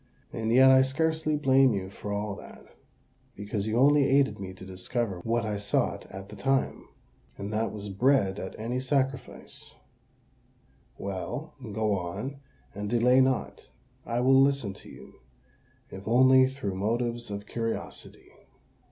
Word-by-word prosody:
"And 110 0 -2
yet 130 +2 +7
I 130 0 +7
scarcely 160 +3 0
blame 135 -4 +4
you 95 -1 -4
for 105 0 -7
all 100 0 -2
that, - - -13 0.7
because 105 0 -4
you 110 +1 0
only 140 +2 +5
aided 135 -3 +3
me 95 -1 -6
to 95 0 -11
discover 95 +2 -3
what 115 +4 -1
I 105 -1 -2
sought 100 0 -1
at 95 +1 -10
the 105 - -9
time—and 105 -3 -4
that 110 +1 0
was 105 -1 -6
bread 100 -2 +2
at 95 - -7
any 120 +3 -2
sacrifice. 135 0 -3 1.2
Well—go 110 - -3
on, 90 +11 -5 0.4
and 105 0 -5
delay 125 +3 +4
not: 130 0 -1 0.3
I 120 +1 -2
will 135 +1 +5
listen 135 -7 +1
to - - -10
you, - - -14 0.7
if 95 +1 -9
only 130 +2 +6
through 130 -7 -4
motives 120 +4 -2
of 100 0 -5
curiosity." 115 +1 -5
115 Hz, 140 wpm, -28 LUFS, 100-130 Hz, 1.2 s, yet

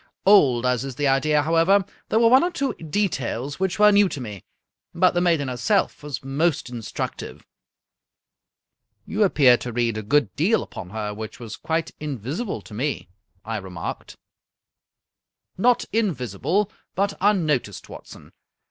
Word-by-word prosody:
Old 135 - +5
as 125 0 +1
is 135 -2 -6
the 145 +1 0
idea, 145 +2 +2
however, 165 +5 +3 0.2
there - - +2
were 230 0 +5
one 260 +5 +6
or 350 - +1
two 280 -6 -2
details 145 - -3
which 190 -1 -1
were 210 0 +6
new 200 -1 +4
to 145 - -6
me. 105 -7 -7 0.5
But 185 +1 +4
the 175 - +1
maiden 165 -6 +2
herself 150 - 0
was 145 -4 -6
most 140 0 -1
instructive." 115 -3 -6 0.8
" 105 0 -55
You 210 - -3
appeared 135 -10 +5
to 120 - -5
read 115 -2 0
a - - -4
good 145 +8 +1
deal 190 +10 +2
upon 90 - -9
her 105 0 -4
which 110 +3 -8
was 115 -3 -7
quite 165 0 -2
invisible 145 - -4
to - - -13
me," 130 - -3 0.4
I 110 0 -3
remarked. 95 -4 -7 0.7
" - - -65 0.2
Not 245 +4 +3
invisible, 185 - 0 0.2
but 200 +1 0
unnoticed, 155 - +1
Watson. - - -12
145 Hz, 155 wpm, -23 LUFS, 120-195 Hz, 0.8 s, one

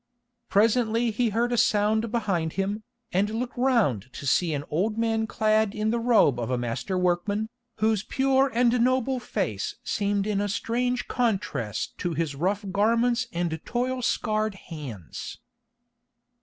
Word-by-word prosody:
Presently 225 +2 +3
he 230 +2 +1
heard 235 +3 0
a - - +1
sound 220 -1 +2
behind 190 -9 -1
him, 200 +2 -2 0.3
and 195 +3 +2
looked 240 +3 -3
round 225 - +1
to 140 - -7
see 165 +5 +2
an 145 -2 -2
old 205 +8 0
man 225 -1 +1
clad 215 -1 +1
in 215 0 0
the 235 - 0
robe 225 - +4
of 120 0 -3
a 125 - 0
master 120 +9 -2
workman, 185 +4 0 0.3
whose 220 -2 +2
pure 270 +3 +2
and 240 +1 +3
noble 255 +1 +1
face 185 - -3
seemed 200 -1 0
in 205 -1 0
a 205 - -1
strange 245 +5 -1
contrast 190 - -2
to 175 -2 -2
his 160 -2 -1
rough 195 +8 -1
garments 235 +5 +2
and 165 -2 -2
toil 250 +1 -1
scarred 215 -3 0
hands. 140 - -8
215 Hz, 150 wpm, -26 LUFS, 175-235 Hz, 0.3 s, robe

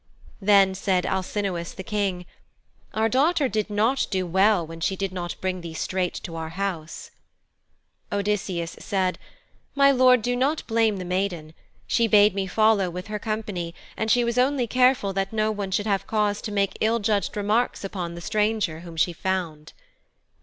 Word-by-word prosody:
Then 195 -1 +5
said 190 -1 0
Alcinous 190 -2 -2
the 190 - -7
King, 195 -4 -2 0.7
'Our 220 +1 +2
daughter 285 +5 +2
did 215 -2 -2
not 220 +6 +1
do 185 -3 -1
well 190 +1 +3
when 165 +1 -9
she 190 - 0
did 195 0 -3
not 175 -2 -5
bring 185 -1 -2
thee 165 -1 -8
straight 180 +2 -2
to 165 - -7
our 160 -1 -4
house.' 170 -3 -5 1.0
Odysseus 195 -4 -2
said, 190 -3 -1 0.6
'My 275 0 +6
Lord, 255 -3 +5
do 245 0 0
not 275 +5 0
blame 225 -2 +2
the 185 - -5
maiden. 180 -4 -2 0.3
She 230 -1 +2
bade 210 -2 +5
me 195 -1 -2
follow 215 -1 +3
with 180 +4 -7
her 210 0 -3
company, 205 -6 -4 0.2
and 220 - -2
she 245 +2 +4
was 235 +1 0
only 260 0 +2
careful 250 -4 +2
that 195 0 -1
no 215 0 +1
one 205 -2 -4
should 205 +2 -1
have 200 -3 0
cause 210 -2 0
to 215 - -5
make 200 -1 -1
ill 225 +2 +3
judged 210 -2 -1
remarks 210 +4 0
upon 180 -3 -4
the 170 - -8
stranger 210 -5 0
whom 170 -1 -10
she 175 +2 +2
found.' 165 -4 -3
200 Hz, 175 wpm, -24 LUFS, 180-220 Hz, 1.0 s, My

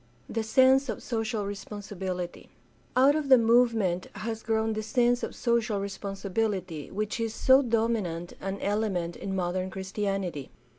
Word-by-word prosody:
The 225 - -2
sense 260 +4 +4
of - - -4
social 225 -3 -2
responsibility. 195 -3 -5 0.2
— 115 - -34
Out 270 +3 +6
of 300 -2 -2
the 260 - +9
movement 225 -6 +3
has 225 0 -4
grown 220 0 0
the 215 - -2
sense 245 +2 +2
of - - -4
social 235 -4 +1
responsibility 195 -4 -3
which 210 +3 -3
is 225 -1 -2
so 260 +1 +6
dominant 220 -8 -1
an 195 +1 -3
element 200 -5 -1
in 190 -1 -4
modern 185 0 -1
Christianity. 190 -5 -3
210 Hz, 145 wpm, -28 LUFS, 190-230 Hz, 0.2 s, the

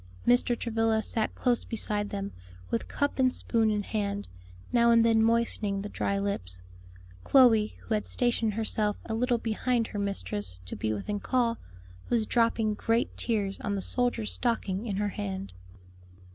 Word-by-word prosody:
Mr. 245 0 +3
Travilla 225 -1 +1
sat 220 -2 0
close 245 -2 +1
beside 210 -2 -3
them, 200 0 -4 0.4
with 230 - -1
cup 285 -1 -1
and 255 -1 +4
spoon 225 -3 +1
in 210 -1 0
hand, 205 -1 -2 0.5
now 235 -1 +5
and 230 -1 +5
then 225 -1 +4
moistening 220 -3 +1
the 205 - -5
dry 200 -1 -1
lips. 95 - -3 0.6
Chloe, 230 -6 +5
who - - -3
had 210 - -1
stationed 235 -3 +1
herself 215 -2 0
a 225 - -4
little 240 +2 +1
behind 230 +1 0
her 205 - -4
mistress 100 - -3
to 90 - -6
be 110 - -2
within 155 - -3
call, 235 0 0 0.5
was 230 -2 +2
dropping 230 -2 +2
great 230 +3 0
tears 205 -4 -1
on 200 - -2
the 195 - -2
soldier's 245 -3 0
stocking 230 -3 -1
in 200 - -2
her 205 +1 0
hand. 95 - -5
220 Hz, 160 wpm, -28 LUFS, 200-235 Hz, 0.6 s, now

